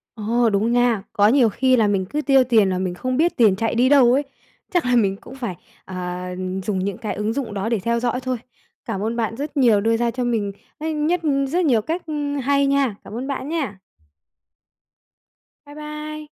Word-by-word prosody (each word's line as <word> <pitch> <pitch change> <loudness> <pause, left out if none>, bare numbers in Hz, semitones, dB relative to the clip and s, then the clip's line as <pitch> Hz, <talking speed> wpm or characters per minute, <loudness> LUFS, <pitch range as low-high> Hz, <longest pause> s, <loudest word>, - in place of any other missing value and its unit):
Ồ, 230 +2 +1
đúng 215 +3 +1
nha. 245 -4 +2
Có 205 0 +4
nhiều 245 -1 +4
khi 255 +4 +2
là 220 -3 +3
mình 195 -2 +1
cứ 300 +1 -1
tiêu 270 -2 +4
tiền 225 -5 +3
là 185 - -1
mình 185 -1 -2
không 255 +7 -2
biết 335 +5 +2
tiền 215 -5 +4
chạy 225 +3 -1
đi 245 +2 +3
đâu 260 -4 +6
ấy. 280 +3 +3 0.5
Chắc 355 -7 +1
là 250 0 +3
mình 195 -4 +2
cũng 260 - -12
phải, 235 -9 -5 0.3
à, 180 -1 -5 0.3
dùng 195 -1 -1
những 190 0 -3
cái 215 - -4
ứng 210 +2 -2
dụng 240 -4 -4
đó 200 +2 -2
để 230 -1 +1
theo 235 +4 -1
dõi 245 +1 -1
thôi. 255 -1 -2 0.5
Cảm 220 -5 -4
ơn 225 +3 -2
bạn 225 -1 -2
rất 290 +2 -5
nhiều 235 -7 +4
đưa 225 +2 +2
ra 235 0 0
cho 250 +1 -3
mình 220 -4 -1 0.3
á 320 +1 -3
nhất 310 +3 0 0.3
rất 350 +5 +1
nhiều 240 -8 +3
cách, 330 +10 -4
ưm, 290 -2 -3
hay 280 +1 +2
nha! 275 -5 +1
Cảm - - -10
ơn 255 +3 -4
bạn 275 0 -4
nhá. 275 - -3 1.9
Bye 290 0 -13
bye. 300 0 -7
240 Hz, 215 wpm, -21 LUFS, 210-280 Hz, 1.9 s, đâu